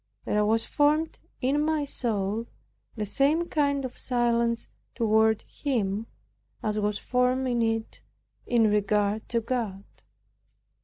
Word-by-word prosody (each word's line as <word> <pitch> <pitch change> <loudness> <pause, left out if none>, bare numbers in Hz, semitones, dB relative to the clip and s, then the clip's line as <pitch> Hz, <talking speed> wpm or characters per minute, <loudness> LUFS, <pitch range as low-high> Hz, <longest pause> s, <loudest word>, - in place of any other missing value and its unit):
There 210 0 +2
was 225 +2 +2
formed 300 +2 +1 0.2
in 275 +3 +2
my 310 -1 +1
soul 220 -4 -1 0.5
the 215 -2 -2
same 295 - +2
kind 280 -2 +1
of 250 - -8
silence 235 -2 +1 0.3
toward 220 -1 +3
him, 220 -6 -2 0.6
as 215 -1 0
was 210 0 0
formed 250 +1 +1
in 240 -2 +1
it 225 -1 -1 0.5
in 235 -2 +3
regard 210 +1 +1
to 235 -1 +1
God. 220 -5 -3
235 Hz, 120 wpm, -27 LUFS, 215-260 Hz, 0.6 s, toward